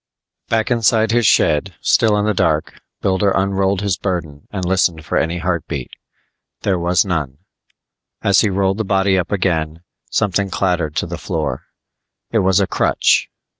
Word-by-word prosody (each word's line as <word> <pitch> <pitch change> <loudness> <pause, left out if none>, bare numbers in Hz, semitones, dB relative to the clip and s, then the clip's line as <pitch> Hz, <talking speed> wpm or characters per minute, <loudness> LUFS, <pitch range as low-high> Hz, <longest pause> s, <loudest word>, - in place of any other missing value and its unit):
Back 115 +2 0
inside 115 -2 +2
his 120 -2 +3
shed, 85 +5 +2
still 110 -3 +3
in 105 - 0
the 105 - +1
dark, 80 -4 -1 0.2
Builder 95 +1 +1
unrolled 95 0 +1
his 100 -3 -1
burden 85 -7 -4
and 95 -3 -4
listened 90 -3 +1
for - - -3
any 85 +2 0
heartbeat. 85 -7 -3 0.7
There 95 -3 0
was 85 +1 +2
none. 75 -8 -2 0.9
As 100 -1 +4
he 110 - +2
rolled 95 +1 0
the - - +1
body 95 -1 +2
up 90 -1 -1
again, 85 -4 -1 0.3
something 100 0 0
clattered 90 -5 -1
to - - 0
the - - -6
floor. - - -3 0.7
It 115 - +2
was 95 -2 +3
a - - +2
crutch. - - +1
95 Hz, 160 wpm, -18 LUFS, 85-100 Hz, 0.9 s, As